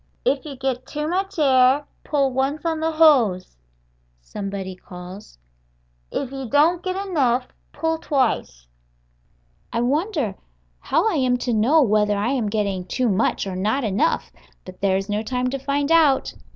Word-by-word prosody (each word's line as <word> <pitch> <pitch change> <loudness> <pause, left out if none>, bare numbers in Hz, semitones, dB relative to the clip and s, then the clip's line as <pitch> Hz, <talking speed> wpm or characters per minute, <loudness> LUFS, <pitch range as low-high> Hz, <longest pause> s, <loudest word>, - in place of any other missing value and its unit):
"If 275 0 +1
you 290 -3 -7
get 260 -1 -3
too 300 0 -3
much 385 +3 -2
air, 265 -1 +4 0.2
pull 280 -3 +1
once 275 +4 -1
on 325 -1 0
the 320 0 -1
hose," 255 - +4 0.6
somebody 190 - -6
calls; 180 - -11 0.7
"if 265 - -4
you 270 -3 -6
don't 320 +6 +3
get 370 0 -3
enough, 255 -8 +1 0.2
pull 325 0 -2
twice." 245 - -1 1.1
I 230 - -1
wonder 290 - 0 0.5
how 425 - +1
I 395 -8 +1
am 255 -2 +2
to 245 -1 -2
know 260 +9 +4
whether 210 -2 +2
I 205 +4 0
am 250 -6 0
getting 200 -3 -1
too 245 +7 0
much 200 +1 +1
or 190 -2 -4
not 215 +9 0
enough, 215 +10 0 0.3
but 185 0 -12
there 190 -1 +2
is 195 0 -4
no 210 0 -1
time 250 +2 -2
to 275 - -3
find 280 +2 -1
out. 310 -5 +4
255 Hz, 160 wpm, -22 LUFS, 210-300 Hz, 1.1 s, air